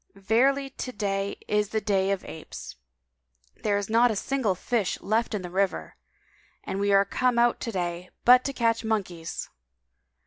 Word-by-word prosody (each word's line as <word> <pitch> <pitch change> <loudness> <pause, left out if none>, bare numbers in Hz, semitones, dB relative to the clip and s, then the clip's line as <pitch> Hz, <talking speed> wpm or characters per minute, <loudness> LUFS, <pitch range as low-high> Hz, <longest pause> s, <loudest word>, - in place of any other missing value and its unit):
Verily, 260 +8 +2
to 255 - -5
day 200 -3 -2
is 210 -1 +1
a - - +3
day 195 -2 +1
of 195 -1 -1
apes: 65 - -9 0.8
there 205 -1 0
is 205 -1 -2
not 230 +2 +4
a 220 - -1
single 230 -3 0
fish 215 0 -1
left 220 +2 0
in 195 - -3
the 180 - -6
river, 195 +1 -1 0.7
and 195 - -4
we 200 0 +1
are 195 0 +5
come 250 +4 +1
out 235 0 +3
to 230 - -4
day 175 -2 -3 0.2
but 250 +1 +8
to 275 - 0
catch 230 -3 +1
monkeys!" 185 -7 -3
210 Hz, 170 wpm, -26 LUFS, 195-235 Hz, 0.8 s, but